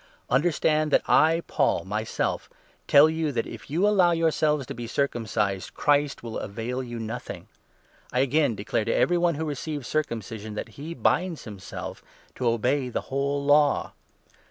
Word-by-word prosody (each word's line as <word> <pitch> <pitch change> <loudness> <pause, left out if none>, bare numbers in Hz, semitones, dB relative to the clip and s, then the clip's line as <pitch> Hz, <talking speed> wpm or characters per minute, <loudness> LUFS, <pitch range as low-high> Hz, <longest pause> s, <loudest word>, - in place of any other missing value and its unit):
Understand 155 +2 +2
that - - +3
I, 165 +2 +4
Paul, - - +1
myself 105 +3 -2 0.4
tell 145 +2 +7
you 160 -1 -1
that 115 -2 -1
if 115 -3 -10
you 175 +8 +2
allow 185 -4 +4
2 - - 0
yourselves 155 -3 +1
to - - -6
be 120 0 -6
circumcised, 110 -7 -1
Christ 145 -2 +1
will 115 -1 -4
avail 115 +5 -4
you 120 -2 -6
nothing. 115 +2 -6 0.6
I - - -11
3 - - +5
again 140 -3 +2
declare 105 +1 -2
to 115 - 0
every 175 0 +3
one 170 -2 +2
who 160 +2 -3
receives 145 -2 -4
circumcision, 115 -7 -3
that 105 - -5
he 150 +9 -8
binds 175 -2 0
himself 100 -4 -8 0.3
to 125 - -2
obey 125 +4 +1
the - - -2
whole 140 +1 -1
Law. 145 0 +3
140 Hz, 165 wpm, -26 LUFS, 115-155 Hz, 0.6 s, tell